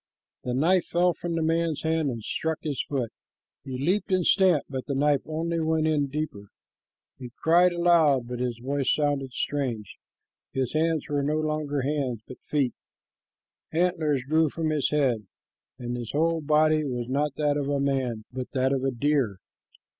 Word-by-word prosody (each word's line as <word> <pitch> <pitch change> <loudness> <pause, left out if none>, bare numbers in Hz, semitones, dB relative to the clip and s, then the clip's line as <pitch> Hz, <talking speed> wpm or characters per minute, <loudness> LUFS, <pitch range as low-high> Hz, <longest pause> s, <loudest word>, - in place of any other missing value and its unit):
The 125 -1 -2
knife 170 +6 +3
fell 175 +1 +2
from 170 0 -4
the 165 - 0
man's 165 -1 0
hand 160 -2 +1
and 115 -4 -5
struck 160 +7 -2
his 145 -5 -1
foot. 130 -6 -1 0.5
He 130 -2 -5
leaped 185 +9 0
and 185 -2 +2
stamped, 185 -7 +4
but 130 -2 -5
the 140 - -1
knife 145 0 +3
only 165 +2 -2
went 160 0 +1
in 150 -3 +2
deeper. 135 -8 -4 0.7
He 125 -2 -7
cried 175 +2 +5
aloud, 165 -7 +3
but 125 0 -5
his 125 -2 -2
voice 135 +2 0
sounded 145 -3 0
strange. 125 -7 -3 0.5
His 130 -2 -1
hands 160 -1 +1
were 145 -1 0
no 150 +2 0
longer 155 -2 -1
hands, 135 -5 -1
but 130 - -10
feet. 140 -5 +1 1.0
Antlers 160 -5 +1
grew 155 +3 +2
from 160 +1 -2
his 150 -3 +1
head, 125 -8 +1 0.5
and 120 -1 -4
his 120 -3 -5
whole 165 +2 +1
body 155 +1 +3
was 125 -4 -3
not 140 +2 0
that 150 -1 +1
of 145 -1 -1
a 140 -1 +1
man, 130 -5 -1
but 130 -1 -5
that 130 0 +2
of 135 -1 -1
a 135 - +2
deer. 130 -5 0
145 Hz, 175 wpm, -26 LUFS, 130-160 Hz, 1.0 s, cried